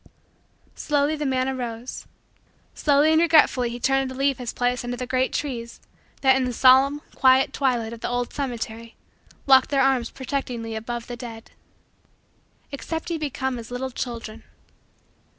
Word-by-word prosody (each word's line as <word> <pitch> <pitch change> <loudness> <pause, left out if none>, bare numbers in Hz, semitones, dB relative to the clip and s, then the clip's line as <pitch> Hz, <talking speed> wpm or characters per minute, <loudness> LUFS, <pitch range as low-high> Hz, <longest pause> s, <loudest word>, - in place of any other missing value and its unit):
Slowly 290 +1 0
the 300 -1 -3
man 260 -1 0
arose. 245 -2 -5 0.7
Slowly 295 +1 +3
and 315 +1 +4
regretfully 305 -7 +4
he 240 +1 -6
turned 270 +1 +1
to 260 - -8
leave 275 0 0
his 245 -2 -4
place 245 0 -1
under 245 0 -4
the 250 - -4
great 255 +1 0
trees 235 -5 -4 0.4
that, 265 -1 +5
in 265 - +1
the 250 - -3
solemn, 270 +4 +5
quiet, 260 0 +4
twilight 240 -5 0
of 230 - -9
the - - -3
old 245 0 -2
cemetery, 230 -4 -5 0.5
locked 265 -1 +6
their 275 -2 +2
arms 260 -3 +2
protectingly 250 -4 -4
above 235 +2 -5
the 245 - -6
dead. 230 -2 -10 1.2
"Except 320 +4 -5
ye 330 - -2
become 265 -4 -3
as 230 - -10
little 255 +2 -4
children." 230 -3 -6
255 Hz, 155 wpm, -24 LUFS, 240-275 Hz, 1.2 s, locked